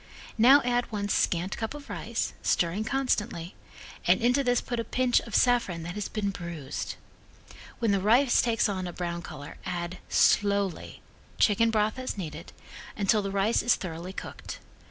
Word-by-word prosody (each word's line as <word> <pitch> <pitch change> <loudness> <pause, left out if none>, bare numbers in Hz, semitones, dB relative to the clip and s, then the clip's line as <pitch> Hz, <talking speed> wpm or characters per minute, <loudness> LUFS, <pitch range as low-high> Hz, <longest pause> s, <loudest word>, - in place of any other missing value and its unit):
Now 270 +5 +7
add 245 0 0
one 205 -1 -2
scant 180 0 +1
cup 225 +5 -4
of 290 -1 -10
rice, - - -3
stirring 175 +5 +1
constantly, 220 -8 -1 0.5
and - - +5
into 250 +4 +2
this 245 -1 +2
put 240 -2 -4
a - - 0
pinch 250 +1 +2
of 230 - -7
saffron 235 -9 +2
that 170 +1 -5
has 210 0 -3
been 205 -2 -2
bruised. 170 -7 -5 0.8
When 230 -3 +1
the 200 -1 +1
rice 240 +6 +4
takes 230 -2 +2
on 185 -3 -3
a 175 - -6
brown 170 -1 -4
color 145 -4 -9
add, 175 0 -4
slowly, 200 -3 +1 0.3
chicken 230 +2 +4
broth 215 +2 +1
as 255 -4 -4
needed, 160 -3 -7 0.5
until 210 +1 +3
the 195 - -3
rice 200 +3 +1
is 240 - +3
thoroughly 175 0 -6
cooked. - - -8
205 Hz, 165 wpm, -28 LUFS, 180-240 Hz, 0.8 s, Now